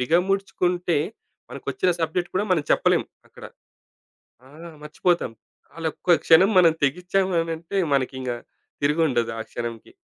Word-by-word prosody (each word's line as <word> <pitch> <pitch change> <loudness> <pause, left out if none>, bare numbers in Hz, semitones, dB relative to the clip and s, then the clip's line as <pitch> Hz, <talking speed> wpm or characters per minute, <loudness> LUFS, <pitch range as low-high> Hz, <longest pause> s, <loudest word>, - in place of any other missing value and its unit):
బిగముడ్చుకుంటే 180 +3 +1 0.5
మనకొచ్చిన 185 - -1
సబ్జెక్ట్ 170 +2 -1
కూడా 195 +3 +1
మనం 160 -5 +2
చెప్పలేం - - +3 0.2
అక్కడ. - - -14 1.0
ఆ! - - -16 0.3
మర్చిపోతాం. 165 -2 0 0.4
ఆల్ 165 -1 -2
ఒక్క 175 -2 +2
క్షణం 175 +5 +6
మనం 170 -3 +6
తెగిచ్చామనంటే 170 +1 -1 0.2
మనకింగ 130 -1 -1 0.5
తిరిగుండదు 145 -6 +1
ఆ - - -4
క్షణంకి. 115 -1 -6
165 Hz, 105 wpm, -23 LUFS, 145-180 Hz, 1.0 s, క్షణం